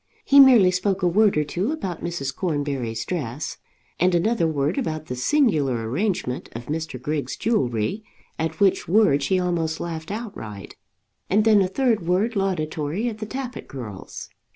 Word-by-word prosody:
He 280 - +6
merely 245 -9 +8
spoke 185 +1 -1
a - - +4
word 205 +1 +3
or 150 - +3
two 180 - -2
about 190 - -4
Mrs. 155 -6 -3
Cornbury's 140 -9 -2
dress, 145 -5 -4 0.4
and 180 +1 +3
another 190 0 +2
word 150 - 0
about 155 - -3
the 125 - -5
singular 140 - +1
arrangement 170 - -2
of 115 +1 -7
Mr. 155 -2 -4
Griggs' 145 +3 -3
jewellery, 135 - -1 0.4
at 160 0 -2
which 195 -2 +2
word 185 -6 +4
she 185 +7 +1
almost 170 -3 -1
laughed 160 -1 -5
outright, 195 - -7 0.5
and 210 +3 +3
then 215 -2 +6
a 190 - +2
third 220 -3 0
word 200 +6 +1
laudatory 180 +1 -1
of 215 - -7
the 215 -1 -6
Tappitt 255 0 -6
girls. 110 -8 -8
175 Hz, 160 wpm, -23 LUFS, 145-210 Hz, 0.5 s, merely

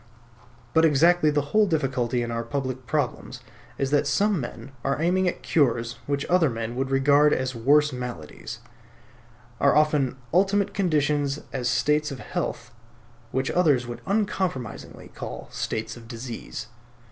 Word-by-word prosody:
But 160 - +5
exactly 160 +2 +5
the 145 -1 -1
whole 215 -1 +5
difficulty 130 -7 0
in 120 - -4
our 115 0 -1
public 130 0 -4
problems 140 -1 -2 0.4
is 135 0 -1
that 145 0 +3
some 200 +6 +2
men 120 0 -7
are 140 - 0
aiming 180 +3 +2
at 175 - -3
cures 120 -6 +1
which 140 0 -1
other 175 -4 +3
men 115 0 -4
would 135 +1 -1
regard 145 +2 +4
as 130 0 -1
worse 145 +5 +3
maladies; 125 -12 -7 1.0
are 140 - +4
offering 150 -4 +3 0.2
ultimate 200 +2 +2
conditions 150 -6 +1
as 125 -2 -1
states 150 +4 +2
of 140 - -6
health - - -4 0.6
which 130 +2 -1
others 150 -8 +3
would 120 0 -7
uncompromisingly 190 - -2
call - - -8
states 110 0 -3
of 115 -1 -12
disease. 115 0 -6
140 Hz, 145 wpm, -25 LUFS, 125-155 Hz, 1.0 s, But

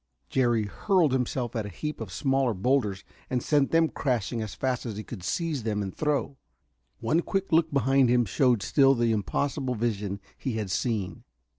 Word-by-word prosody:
Jerry 120 -4 +2
hurled 175 - +2
himself 125 -2 -1
at 110 -3 -2
a - - -6
heap 150 - -5
of 105 -4 -6
smaller 135 +3 +1
boulders 105 -2 0 0.3
and 125 -2 -1
sent 145 -3 +2
them 165 0 +4
crashing 120 -6 -1
as 110 -2 -5
fast 130 -2 -1
as 110 -4 -5
he 110 - -5
could 110 -4 -8
seize 160 - -2
them 105 -2 -1
and 95 - -6
throw. 145 -2 -1 0.6
One 165 +3 +2
quick 195 +2 -2
look 160 0 +3
behind 135 -1 +3
him 120 0 +3
showed 120 +1 +2
still 135 +3 +4
the 120 -1 +2
impossible 125 - -1
vision 105 -3 -2 0.2
he 130 - -4
had 105 -4 -3
seen. 105 -2 -2
125 Hz, 180 wpm, -27 LUFS, 110-140 Hz, 0.6 s, them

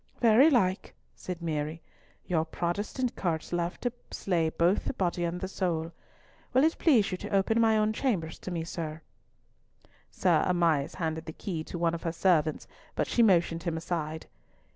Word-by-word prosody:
"Very 240 +6 +6
like," 190 -9 +1 0.2
said 180 -2 -6
Mary. 155 0 -2 0.5
"Your 165 -3 +1
Protestant 205 +10 -2
courts 165 -2 -2
love 175 +1 -1
to 245 -2 -1 0.2
slay 170 -4 0
both 175 +10 +1
body 175 -2 0
and 175 +2 -2
soul. 170 -4 -2 0.6
Will 260 +2 +5
it 320 +1 +2
please 240 - +4
you 185 - -3
to - - -6
open 200 +4 +2
my 220 -1 +4
own 215 0 +2
chambers 195 - -1
to - - -7
me, 170 -2 -2
sir?" 160 -2 -5 1.1
Sir - - +2
Amias 165 -5 +1
handed 160 -2 -3
the 160 - -7
key 165 -4 -4
to - - -6
one 170 -1 +1
of 165 - -4
her 165 - -2
servants 165 -3 +1 0.3
but - - +1
she 240 - +1
motioned 170 -6 +3
him 165 -2 -2
aside. 160 -2 -3
175 Hz, 165 wpm, -29 LUFS, 165-200 Hz, 1.1 s, Very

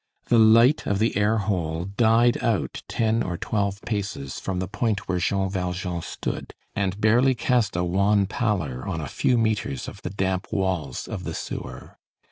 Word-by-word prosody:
The 120 - +5
light 115 +6 +5
of 100 - +1
the 110 +3 +1
air 105 +2 +2
hole 85 -5 -1
died 115 +4 +3
out 115 -4 0
ten 115 0 +1
or 90 -6 -2
twelve 100 0 -1
paces 100 - -4
from 95 -1 -3
the 90 0 -2
point 105 +1 -1
where 90 -1 0
Jean 95 +2 +1
Valjean 90 -2 -3
stood, - - -5 0.2
and 100 0 -1
barely 120 +5 +4
cast 120 -2 +1
a 90 - +1
wan 100 +3 +2
pallor 95 - -1
on 80 - -2
a 75 - -4
few 125 - +1
metres 110 - -1
of - - -9
the - - -4
damp 95 -1 -1
walls 90 -9 -2
of - - -5
the - - -4
sewer. - - -7
100 Hz, 175 wpm, -25 LUFS, 90-110 Hz, 0.2 s, The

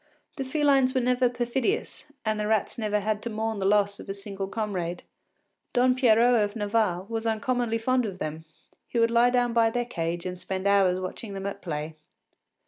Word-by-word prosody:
The 270 - -2
felines 270 -1 +2
were - - +4
never 250 0 +2
perfidious, 250 - -2 0.2
and 215 0 0
the 210 - -1
rats 215 -1 +1
never 210 -1 0
had 210 +1 -1
to 235 - -4
mourn 220 -1 -2
the 190 - +1
loss 200 0 +2
of - - -10
a 195 - -3
single 195 -1 -6
comrade. 190 -5 -3 0.7
Don 255 0 +4
Pierrot 240 -2 +4
of 205 +1 -3
Navarre 205 -4 0
was 225 0 -3
uncommonly 230 +1 0
fond 250 +1 +1
of 190 -2 -6
them; 155 -1 -5 0.4
he - - -4
would 230 0 +3
lie 235 +1 +5
down 245 -1 +1
by 230 -1 +4
their 240 +1 -1
cage 170 -5 -3
and 180 -1 -5
spend 190 +1 -4
hours 195 -2 +4
watching 195 +3 -6
them 195 0 -5
at 200 0 -4
play. 155 -2 -4
220 Hz, 195 wpm, -27 LUFS, 195-240 Hz, 0.7 s, lie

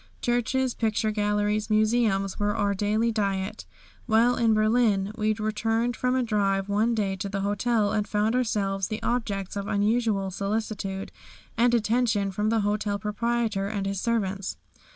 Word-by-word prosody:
Churches, 245 +1 0
picture 220 -1 0
galleries, 210 0 0
museums 215 -3 +1
were 205 0 0
our 205 0 +1
daily 215 +4 +1
diet. 195 -3 -2 0.4
While 235 +2 +4
in 225 -2 +3
Berlin 215 -2 +2
we 215 -1 +1
returned 225 +2 -1
from 250 0 0
a 260 - +2
drive 200 -3 0
one 215 +3 +1
day 200 -3 0
to 200 +1 -4
the 195 0 -3
hotel 205 +1 +1
and 210 -1 0
found 210 +2 +1
ourselves 195 -6 0
the 215 - -5
objects 205 -6 -2
of 200 0 -4
unusual 210 -2 +1
solicitude 200 -1 -3 0.4
and 240 +1 +3
attention 220 -3 +1
from 210 +3 -1
the 225 -1 +2
hotel 205 0 0
proprietor 215 -1 -1
and 200 -1 -3
his 195 -1 -2
servants. 200 -5 -1
210 Hz, 150 wpm, -26 LUFS, 200-230 Hz, 0.4 s, While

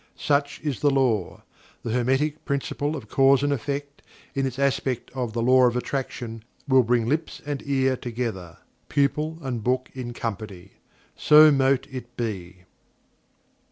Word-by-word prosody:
Such 145 -1 0
is 145 -6 -2
The 145 - +3
Law. 125 -9 0 0.4
The 115 - -3
Hermetic 135 +6 0
Principle 145 +1 -2
of 125 -8 -8
Cause 135 +3 +4
and 145 0 +2
Effect, 140 +2 -4 0.3
in 135 -1 0
its 130 -1 -6
aspect 135 -2 -1
of 125 -4 -3
The 115 0 -1
Law 130 +1 +6
of 120 0 0
Attraction, 120 -3 -4 0.2
will 130 -1 +6
bring 120 -1 +1
lips 155 +5 -1
and 145 -2 -3
ear 135 -1 +2
together 115 -9 -5 0.3
pupil 150 +3 0
and 125 -5 -3
book 130 +2 0
in 125 -2 -6
company. 100 -5 -6 0.4
So 150 0 +7
mote 135 -1 +2
it 125 -2 -8
be! 95 -6 -5
130 Hz, 150 wpm, -25 LUFS, 120-140 Hz, 0.4 s, So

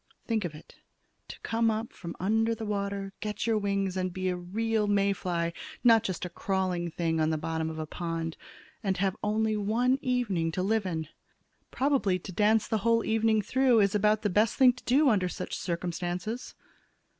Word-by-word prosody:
Think 220 -4 0
of 160 -3 -5
it, 150 - -15 0.5
to - - -10
come 225 0 +1
up 220 +1 -2
from 170 0 -8
under 225 +4 +1
the 225 0 -6
water, 200 -1 -3
get 210 -1 -3
your 225 -2 +2
wings 200 -2 -1
and 185 -1 -1
be 185 +1 -2
a 180 - 0
real 210 +4 -1
May 200 -1 +3
fly, 170 -3 -2 0.3
not 230 -2 +7
just 185 -5 -3
a - - -4
crawling 185 -1 -1
thing 165 -1 -1
on 155 0 +2
the 160 - 0
bottom 160 +1 -2
of 160 - -6
a 155 - -3
pond, 165 0 -4 0.5
and 195 -4 -1
have 190 0 0
only 215 +1 +1
one 235 +6 +1
evening 205 -10 0
to 185 - -1
live 210 0 +1
in! 160 -3 -3 0.6
Probably 260 -9 +1
to 185 - -9
dance 215 +4 +3
the 220 - 0
whole 230 +2 +2
evening 220 -1 +2
through 260 0 +3
is 200 0 +2
about 210 +1 +2
the 205 - +1
best 210 +4 +2
thing 255 -2 +6
to 250 - -15
do 280 +4 +4
under 195 -7 +3
such - - -5
circumstances." 180 +5 -4
200 Hz, 190 wpm, -29 LUFS, 180-225 Hz, 0.6 s, not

